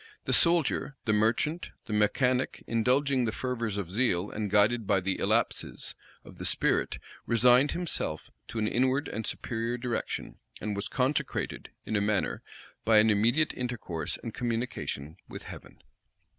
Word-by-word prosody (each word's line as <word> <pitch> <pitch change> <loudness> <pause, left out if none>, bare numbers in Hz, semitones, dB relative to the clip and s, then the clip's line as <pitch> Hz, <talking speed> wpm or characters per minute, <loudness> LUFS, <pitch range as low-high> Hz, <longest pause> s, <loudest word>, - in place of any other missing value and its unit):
The - - 0
soldier, 170 -4 +3
the 110 - +2
merchant, 115 +10 +1 0.2
the 110 - -5
mechanic, 125 +5 +1
indulging 130 +3 +2
the 110 - 0
fervors 115 -4 -3
of 95 -4 -4
zeal, 100 -4 +1
and 105 -1 -3
guided 105 +2 +3
by 95 - +3
the 95 +1 -2
illapses - - 0 0.3
of - - -13
the - - -5
spirit, - - +1 0.3
resigned 125 +4 +5
himself 170 - -2 0.2
to - - -7
an 110 -1 +1
inward 130 +5 +1
and 110 +1 -4
superior 115 +1 -2
direction, 120 -1 -4 0.2
and 105 -1 -3
was 100 - -2
consecrated, 135 +2 -1 0.2
in 110 - -2
a 100 - +2
manner, 105 -1 0 0.4
by 110 0 +5
an 110 +1 +6
immediate 120 +9 +3
intercourse 105 -11 -3
and 115 - -5
communication 115 - -3
with - - -8
heaven. - - -11
115 Hz, 150 wpm, -29 LUFS, 105-130 Hz, 0.4 s, an